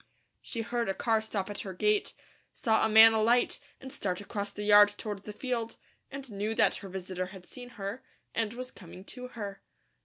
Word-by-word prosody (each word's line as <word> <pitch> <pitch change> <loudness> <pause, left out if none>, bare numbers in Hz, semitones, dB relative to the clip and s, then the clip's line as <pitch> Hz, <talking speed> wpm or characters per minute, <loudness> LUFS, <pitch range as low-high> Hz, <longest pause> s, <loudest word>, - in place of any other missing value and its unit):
She 230 -2 -4
heard 235 -1 -1
a 195 - -1
car 225 -2 +1
stop 210 -3 -3
at 205 - -6
her 190 -2 -6
gate, 210 +2 +1 0.4
saw 220 -3 +2
a 220 - +3
man 220 +1 +9
alight 230 +3 +2 0.2
and 265 0 -9
start 180 -3 -2
across 205 0 -4
the 205 +1 -6
yard 205 0 +8
toward 205 -2 -6
the 210 - -6
field, 230 0 -3 0.3
and 270 -2 -8
knew 210 +2 -2
that - - +3
her 195 - -9
visitor 185 0 -4
had 190 -1 -12
seen 245 +3 -10
her, 205 +6 -5 0.3
and 225 -1 -1
was 255 +1 -7
coming 185 -1 -12
to 250 +5 -8
her. 205 -5 -7
215 Hz, 195 wpm, -30 LUFS, 200-235 Hz, 0.4 s, man